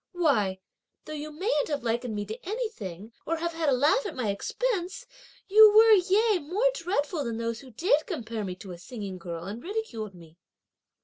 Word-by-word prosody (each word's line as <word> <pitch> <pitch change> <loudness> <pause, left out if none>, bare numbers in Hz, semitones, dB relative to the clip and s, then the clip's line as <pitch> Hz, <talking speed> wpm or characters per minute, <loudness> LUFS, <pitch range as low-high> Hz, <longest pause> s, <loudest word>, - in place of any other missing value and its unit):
why, 225 - +1 0.5
though 310 - -7
you 305 0 -5
mayn't 305 -1 0
have 290 -4 -2
likened 235 -1 -1
me 205 0 -3
to 220 +3 -8
anything, 230 - -5
or 330 - 0
had 340 +1 -2 0.2
a - - +3
laugh 290 - +3
at 410 - -5
my 230 -6 0
expense, 375 - -2 0.4
you 425 +2 +9
were, 445 +1 +8
yea 410 +1 +4
more 390 +12 +1
dreadful 335 -6 -1
than 230 -3 -3
those 230 0 -3
who 265 - -13
did 310 - +1
compare 230 - -4
me 185 -2 -4
(to 185 +1 -10
a 175 - -9
singing 195 -1 -7
girl) 170 -1 -6
and 205 +6 -6
ridiculed 260 - -4
me!" 165 -1 -16
285 Hz, 185 wpm, -28 LUFS, -, 0.5 s, you